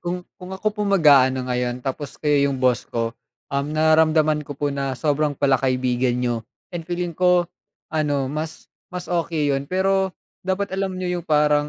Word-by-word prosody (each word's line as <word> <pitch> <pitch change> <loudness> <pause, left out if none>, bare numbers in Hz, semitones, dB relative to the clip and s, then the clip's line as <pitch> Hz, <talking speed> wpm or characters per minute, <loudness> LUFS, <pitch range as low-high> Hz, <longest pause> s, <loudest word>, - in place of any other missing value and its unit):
kung 180 +1 -4 0.2
kung 185 +1 -7
ako 215 +2 -1
po 210 - -7
ang 200 - +4
mag-a-ano 130 -6 +5
ngayon, 125 0 -2
tapos 140 +2 -4
kayo 145 -2 +2
'yung 135 - -2
boss 125 -2 +1
ko, 115 -1 -2 0.4
um, 140 0 0
nararamdaman 155 -1 +4
ko 145 -2 -8
po 145 0 -1
na 135 -1 -2
sobrang 150 0 0
palakaibigan 130 -2 +1
niyo, 125 -1 0 0.4
and 170 -1 -6
feeling 175 0 -2
ko, 180 +1 +3 0.5
ano, 145 -3 +1
mas 155 +4 -5 0.2
mas 180 -1 -6
okey 165 -4 0
yun. 135 0 -2
Pero 190 0 +1 0.2
dapat 190 +1 -2
alam 190 -1 -2
niyo 180 -1 -2
'yung - - -16
parang 150 -1 +3
150 Hz, 175 wpm, -22 LUFS, 135-180 Hz, 0.5 s, mag-a-ano